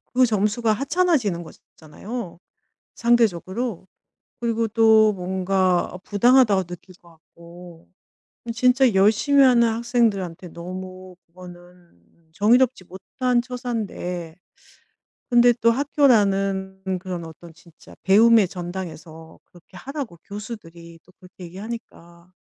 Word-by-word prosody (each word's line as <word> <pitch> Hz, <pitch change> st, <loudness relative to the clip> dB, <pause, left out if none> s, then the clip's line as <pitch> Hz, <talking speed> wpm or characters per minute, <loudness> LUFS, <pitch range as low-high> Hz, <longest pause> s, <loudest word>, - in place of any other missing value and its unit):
그 255 Hz, -, +5 dB
점수가 215 Hz, +1 st, 0 dB
하찮아지는 275 Hz, -, 0 dB
것이 160 Hz, -, -15 dB, 0.2 s
잖아요 180 Hz, +4 st, -8 dB, 0.6 s
상대적으로. 230 Hz, -3 st, 0 dB, 0.5 s
그리고 230 Hz, -1 st, -1 dB
또 220 Hz, -1 st, +4 dB
뭔가 185 Hz, -1 st, -1 dB
부당하다고 215 Hz, -2 st, +3 dB
느낄 180 Hz, +1 st, -12 dB
것 170 Hz, -, -20 dB
같고. 170 Hz, +1 st, -16 dB, 0.7 s
진짜 250 Hz, 0 st, +3 dB
열심히 220 Hz, +9 st, +3 dB
하는 240 Hz, -3 st, +5 dB
학생들한테 220 Hz, -7 st, -1 dB
너무 185 Hz, +2 st, -9 dB
그거는 175 Hz, -, -17 dB
정의롭지 235 Hz, +2 st, +2 dB
못한 240 Hz, +7 st, -2 dB
처사인데 215 Hz, -9 st, -5 dB, 0.9 s
근데 240 Hz, 0 st, +5 dB
또 230 Hz, 0 st, +4 dB
학교라는 195 Hz, -8 st, +1 dB
음 185 Hz, -1 st, -2 dB
그런 180 Hz, -2 st, -6 dB
어떤 165 Hz, +1 st, -13 dB
진짜 170 Hz, 0 st, -19 dB
배움의 215 Hz, 0 st, +5 dB
전당에서 170 Hz, -3 st, -9 dB
그렇게 175 Hz, +1 st, -18 dB
하라고 275 Hz, -, -7 dB
교수들이 175 Hz, -6 st, -10 dB
또 185 Hz, -, -23 dB
그렇게 180 Hz, 0 st, -14 dB
얘기하니까 180 Hz, -3 st, -10 dB
195 Hz, 270 characters per minute, -22 LUFS, 175-235 Hz, 0.9 s, 그